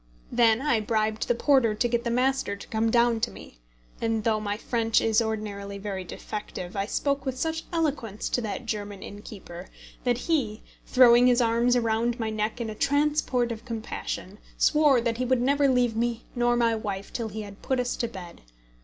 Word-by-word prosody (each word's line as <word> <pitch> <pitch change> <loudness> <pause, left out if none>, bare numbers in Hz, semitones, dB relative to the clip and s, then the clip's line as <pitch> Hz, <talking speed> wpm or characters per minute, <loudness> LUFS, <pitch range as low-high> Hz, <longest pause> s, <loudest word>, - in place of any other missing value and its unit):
Then 235 +1 +4
I 265 -7 +2
bribed 215 0 -1
the 240 - +2
porter 235 -4 +3
to 240 - +1
get 235 0 0
the 235 - -1
master 255 -3 +1
to 200 - -11
come 225 0 +1
down 235 0 +3
to 235 - 0
me; - - -13 0.4
and, 225 -1 0
though 220 -1 +2
my 205 -1 -3
French 225 -1 +1
is 225 0 +2
ordinarily 205 -3 -4
very 195 -2 -4
defective, 185 -1 -7
I 195 0 -1
spoke 280 +3 -1
with 265 -2 -3
such 320 +3 -2
eloquence 285 - -1
to 245 - 0
that 220 +2 -4
German 205 -3 -4
innkeeper 195 -3 -9 0.4
that 245 -2 +1
he, 250 -7 -1 0.2
throwing 245 -1 +6
his 245 0 +4
arms 235 +1 +3
round 230 +1 0
my 220 -1 -1
neck 215 +2 -2
in 225 -2 -3
a - - -5
transport 285 -1 +1
of 225 -1 -6
compassion, 220 -4 -5 0.2
swore 295 -5 +4
that 230 -1 -1
he 255 - -1
would 255 0 +2
never 280 +3 +3
leave 245 -3 +2
me 235 0 -1
nor 240 0 +2
my 235 -1 +3
wife 200 -3 -4
till 230 -2 -3
he 215 +1 -5
had 200 -1 -11
put 260 -1 0
us 245 0 -1
to 235 - -1
bed. 185 -6 -10
230 Hz, 195 wpm, -26 LUFS, 215-250 Hz, 0.4 s, throwing